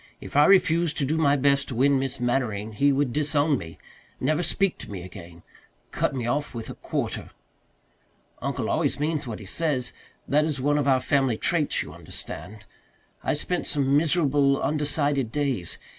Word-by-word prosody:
If -, -, -10 dB
I 145 Hz, +1 st, +7 dB
refused 175 Hz, -4 st, +4 dB
to 140 Hz, -, +2 dB
do 150 Hz, +4 st, 0 dB
my 145 Hz, -2 st, +4 dB
best 140 Hz, 0 st, +2 dB
to 125 Hz, -, -5 dB
win 135 Hz, +3 st, +3 dB
Miss 135 Hz, -2 st, -3 dB
Mannering 120 Hz, -4 st, -1 dB
he 140 Hz, +7 st, +2 dB
would 135 Hz, -3 st, 0 dB
disown 150 Hz, -1 st, +2 dB
me 80 Hz, -2 st, -10 dB, 0.4 s
never 155 Hz, +5 st, +1 dB
speak 195 Hz, +1 st, 0 dB
to -, -, -8 dB
me 95 Hz, -3 st, -6 dB
again 85 Hz, -2 st, -11 dB, 0.5 s
cut -, -, -1 dB
me 125 Hz, -3 st, -3 dB
off 140 Hz, +3 st, -2 dB
with 115 Hz, -1 st, -5 dB
a -, -, -6 dB
quarter. -, -, -4 dB, 1.1 s
Uncle -, -, -2 dB
always -, -, 0 dB
means 150 Hz, -2 st, -1 dB
what 110 Hz, -, -4 dB
he 105 Hz, -, -10 dB
says 130 Hz, +1 st, -1 dB, 0.3 s
that 150 Hz, +2 st, +3 dB
is 150 Hz, -3 st, -1 dB
one 145 Hz, +3 st, +2 dB
of 140 Hz, -, 0 dB
our 130 Hz, -2 st, +4 dB
family 135 Hz, -6 st, +1 dB
traits, 155 Hz, +1 st, +1 dB
you -, -, -10 dB
understand. 105 Hz, +2 st, -7 dB, 0.6 s
I -, -, +1 dB
spent 175 Hz, +4 st, -1 dB
some 140 Hz, -2 st, +2 dB
miserable, 145 Hz, -3 st, +3 dB
undecided 145 Hz, -4 st, 0 dB
days. 135 Hz, -, -1 dB
140 Hz, 175 wpm, -25 LUFS, 125-150 Hz, 1.1 s, I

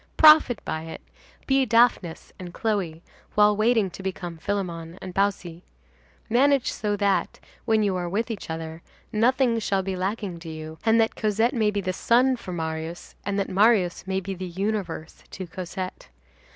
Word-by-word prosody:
Profit 305 Hz, -7 st, +7 dB
by 160 Hz, 0 st, -3 dB
it. 160 Hz, -, -8 dB, 0.4 s
Be 270 Hz, 0 st, +3 dB
Daphnis 230 Hz, -7 st, +2 dB
and 175 Hz, -2 st, -8 dB
Chloe, 185 Hz, -7 st, -2 dB, 0.3 s
while 210 Hz, 0 st, +5 dB
waiting 215 Hz, -2 st, +2 dB
to 195 Hz, -, -9 dB
become 180 Hz, -3 st, -5 dB
Philemon 170 Hz, -3 st, -3 dB
and 185 Hz, -, -8 dB
Baucis. 190 Hz, -4 st, -1 dB, 0.7 s
Manage 270 Hz, +3 st, +3 dB
so 210 Hz, -1 st, -2 dB
that, 200 Hz, -1 st, 0 dB, 0.3 s
when 220 Hz, -1 st, +3 dB
you 200 Hz, -2 st, +1 dB
are 175 Hz, -1 st, -2 dB
with 225 Hz, +6 st, -1 dB
each 210 Hz, -6 st, -6 dB
other, 160 Hz, 0 st, -5 dB, 0.3 s
nothing 240 Hz, +1 st, +2 dB
shall 195 Hz, -3 st, 0 dB
be 190 Hz, 0 st, -3 dB
lacking 190 Hz, -1 st, -3 dB
to 165 Hz, -1 st, -9 dB
you, 155 Hz, 0 st, -8 dB
and 225 Hz, +1 st, +4 dB
that 225 Hz, 0 st, +2 dB
Cosette 220 Hz, +2 st, +1 dB
may 220 Hz, -3 st, +2 dB
be 205 Hz, -1 st, -1 dB
the 185 Hz, -1 st, -2 dB
sun 250 Hz, +6 st, +3 dB
for 210 Hz, -6 st, -8 dB
Marius, 160 Hz, 0 st, -5 dB
and 200 Hz, 0 st, -1 dB
that 200 Hz, -, 0 dB
Marius 190 Hz, -2 st, +3 dB
may 190 Hz, 0 st, 0 dB
be 195 Hz, +1 st, -5 dB
the 185 Hz, 0 st, -6 dB
universe 185 Hz, -3 st, -4 dB
to 190 Hz, -, -7 dB
Cosette. 185 Hz, +1 st, -6 dB
195 Hz, 170 wpm, -25 LUFS, 175-220 Hz, 0.7 s, Profit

